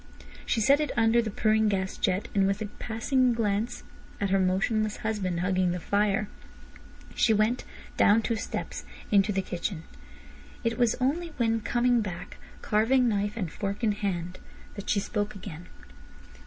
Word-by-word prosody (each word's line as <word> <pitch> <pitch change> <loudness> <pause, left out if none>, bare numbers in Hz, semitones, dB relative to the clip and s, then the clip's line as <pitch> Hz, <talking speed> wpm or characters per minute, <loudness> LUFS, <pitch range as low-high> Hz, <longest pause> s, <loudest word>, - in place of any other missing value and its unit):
She 230 - +1
set 280 +7 +5
it 300 - 0
under 225 +1 +4
the 225 - -3
purring 215 +1 +2
gas 190 -1 -1
jet, 195 +5 0
and 195 -1 +3
with 195 +1 0
a 215 - -3
passing 245 +2 +1
glance 225 +1 -1 0.4
at 200 -2 -1
her 195 - +4
motionless 205 +3 +1
husband 190 -6 -1
hugging 185 -1 +1
the 180 - -3
fire, 200 +3 +1 0.9
she 220 - +3
went 215 +4 +1 0.3
(down 220 +2 +5
two 230 - 0
steps) 220 - -5 0.3
into 205 0 +4
the 195 -1 0
kitchen. 175 -1 -4 0.8
It 230 -1 -1
was 240 -3 +3
only 315 +6 0
when 225 -2 +1
coming 240 +1 +2
back, 180 -3 -6 0.3
carving 240 +4 +3
knife 205 -1 0
and 180 -8 -3
fork 200 +4 -4
in 220 - +3
hand, 185 -4 -3 0.3
that 200 -1 -7
she 205 - +3
spoke 205 0 -2
again. 180 -3 -9
210 Hz, 160 wpm, -28 LUFS, 195-230 Hz, 0.9 s, set